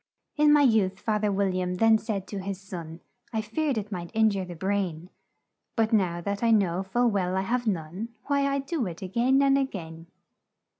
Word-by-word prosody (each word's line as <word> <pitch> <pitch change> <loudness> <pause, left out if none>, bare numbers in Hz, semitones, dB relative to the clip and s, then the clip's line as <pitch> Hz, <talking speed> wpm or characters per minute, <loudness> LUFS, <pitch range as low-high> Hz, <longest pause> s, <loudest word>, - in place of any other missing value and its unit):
"'In 300 -1 +5
my 295 -1 +6
youth,' 210 -6 +3
Fath 215 -1 -1
er 210 - +2
Wil 195 -1 +1
liam 180 0 -2
then 225 +1 +5
said 205 -4 -3
to 200 - -4
his 190 0 -5
son, 170 -4 -8 0.3
'I 220 - 0
feared 270 +5 -1
it 210 0 -4
might 175 -3 -5
in 220 -1 +4
jure 195 -2 -2
the 175 -1 -8
brain; 185 -2 -2 0.6
But 225 -1 +1
now 180 -5 +2
that 200 +3 -3
I 230 - +2
know 190 -5 +3
full 235 +5 +1
well 185 -2 0
I - - +2
have 240 +4 -1
none, 185 +3 -3 0.2
Why, 280 -1 +1
I 275 - +1
do 275 - -2
it 170 +1 -7
a - - -3
gain 255 +7 +3
and 275 0 +4
a - - +3
gain.' 165 -9 -7
200 Hz, 215 wpm, -27 LUFS, 185-230 Hz, 0.6 s, my